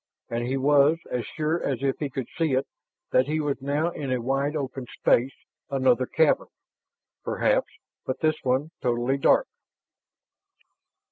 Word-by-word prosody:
And 120 +1 -1
he 135 +2 0
was 145 +3 +4
as 125 -1 -2
sure 160 +2 -1
as 135 -2 -2
if 135 -1 0
he 145 - -2
could 130 -2 -4
see 160 -4 +1
it, 130 +1 +1 0.5
that 130 +1 +3
he 155 +1 0
was 145 -3 -2
now 145 +5 0
in 140 -5 -4
a 125 - +1
wide 135 +5 -1
open 135 -3 -4
space, 130 +3 +2 0.3
another 130 -2 +2
cavern; 160 -2 +2 0.8
perhaps, - - +1 0.3
but 130 - -3
this 155 -1 +1
one 135 +4 0
totally 120 +2 +1
dark. - - +4
135 Hz, 150 wpm, -26 LUFS, 130-150 Hz, 0.8 s, was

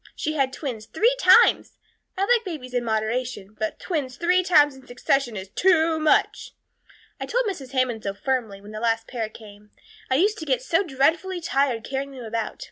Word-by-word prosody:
She 310 - -2
had 270 -3 0
twins 245 -7 -6
three 460 +9 +2
times. - - +5 0.4
I - - -2
like 470 +2 +3
babies 300 - -7
in 245 -1 0
moderation, 220 -1 -2
but 215 0 -2
twins 285 -8 -3
three 360 +1 +3
times 295 -6 +4
in 265 -1 -16
succession 245 -1 -1
is 190 0 -7
too 330 - +2
much. 310 -1 +1 0.6
I - - -5
told - - 0
Mrs. 280 -11 -5
Hammond 255 -4 0
so 200 -1 -4
firmly, 230 -4 -2
when 205 +1 -12
the 215 - -6
last 225 0 0
pair 230 -4 -4
came. 210 -1 -14 0.4
I 260 - +2
used 410 +9 +2
to 315 - -6
get 260 -4 0
so 330 +7 +2
dreadfully 335 +4 0
tired 275 -8 0
carrying 275 +1 -4
them 255 -2 -9
about. 225 0 -4
265 Hz, 190 wpm, -24 LUFS, 225-320 Hz, 0.6 s, times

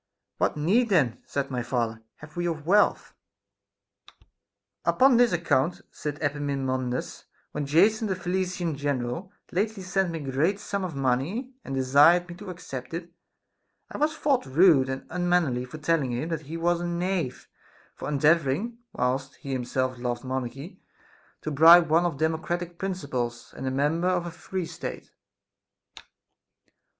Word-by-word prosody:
What - - +1
need 210 +11 +2
then, 135 - +2
said 140 -1 -2
my 125 -1 -1
father, 115 -2 -2
have 150 0 -14
we 175 0 -1
of 160 -3 -3
wealth] 205 +5 +3 1.7
Upon 260 -2 +5
this 245 -1 +5
account, 170 -2 +1
said 150 -1 -5
Epaminondas, 135 -3 -2 0.3
when 145 -2 -3
Jason, 210 +9 +4
the 190 - -1
Thessalian 180 -2 -2
general, 140 +5 -3 0.2
lately 205 +2 -1
sent 190 0 0
me 165 - -3
a - - -2
great 165 +10 +1
sum 200 -1 -3
of 175 -5 -4
money 140 - -1
and 135 - -5
desired 145 +7 +5
me 175 - -8
to 200 0 -9
accept 135 -6 -7
it, 170 0 -7 0.8
I - - -6
was 305 +1 +1
thought 275 - +1
rude 140 -2 +5
and 130 0 -4
unmannerly 175 -8 +1
for 125 +5 -9
telling 150 -4 0
him 150 +7 -2
that 155 -4 -4
he 165 - -4
was 170 +1 +1
a 175 - -2
knave 175 -7 -2 0.5
for - - -6
endeavoring, 155 - +2
whilst 130 +2 -1
he 140 - -8
himself 130 0 -1
loved 120 -1 -3
monarchy, 130 - -5 0.6
to 155 - -3
bribe 165 +3 +7
one 165 +2 +4
of 165 -5 -1
democratical 165 +3 -1
principles 140 -11 -4
and 135 - -5
a - - +2
member 150 +6 +1
of 180 -1 0
a 175 - -5
free 185 +2 -4
state. - - -7
160 Hz, 150 wpm, -26 LUFS, 135-180 Hz, 1.7 s, bribe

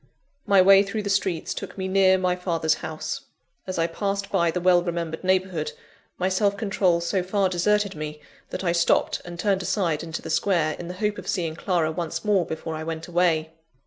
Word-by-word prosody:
My 195 -2 +6
way 195 +1 +8
through 205 +2 -3
the 200 - -1
streets 190 -4 0
took - - -7
me 190 -1 -2
near 190 0 +4
my 180 -1 +1
father's 165 -3 0
house. 155 0 -5 0.4
As 185 - -3
I 165 - +2
passed 200 +4 -3
by 170 -4 +2
the 165 - -1
well 180 0 +4
remembered 170 -2 -3
neighbourhood, 185 -4 0 0.4
my 185 - 0
self 200 +2 +1
control 195 -5 +1
so 185 +2 0
far 190 +1 +1
deserted 200 +3 +1
me, 150 0 -6 0.3
that - - -5
I 175 - +2
stopped 170 -1 +2
and 175 0 -8
turned 195 +1 +1
aside 175 -5 0
into 165 -1 -6
the 160 - -5
Square, 155 -2 +1
in 175 - -6
the 180 - -6
hope 210 +2 -1
of - - -10
seeing 165 -5 -1
Clara 170 -2 0
once 165 +4 -4
more 195 -5 +2
before 160 0 -5
I 155 0 -4
went 160 0 -5
away. 170 -3 +1
180 Hz, 205 wpm, -25 LUFS, 165-195 Hz, 0.4 s, way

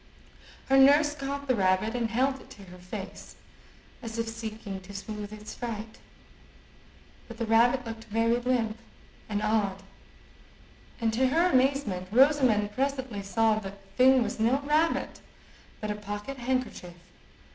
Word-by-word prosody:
Her 270 0 +4
nurse 290 +2 +6
caught 280 -1 -5
the 255 - +3
rabbit, 190 +1 +1
and 235 -2 -1
held 265 +3 0
it - - -17
to 200 - -13
her 180 -1 -13
face, 195 +2 -8 0.7
as 230 -2 -6
if 230 0 -1
seeking 220 -3 -6
to 195 +2 -12
sooth 210 +1 -6
its 215 0 -9
fright. 225 -2 -6 1.3
But 230 - -10
the 230 - -2
rabbit 240 +3 +3
looked 225 0 -7
very 230 +2 +1
limp 235 -3 0 0.5
and 210 0 -1
odd, 205 -3 0 1.2
and, 225 -2 0
to 260 +3 +3
her 335 +7 +3
amazement, 255 -9 +1
Rosamond 250 -5 +4
presently 260 -3 -2
saw 215 +3 +2
that 195 -1 -8
the 195 - -25
thing 255 +4 +5
was 225 - -5
no 245 +5 +2
rabbit, 305 +3 0 0.6
but 215 -1 -3
a - - -2
pocket 210 +5 -6
handkerchief. 250 -8 -3
225 Hz, 145 wpm, -28 LUFS, 210-260 Hz, 1.3 s, nurse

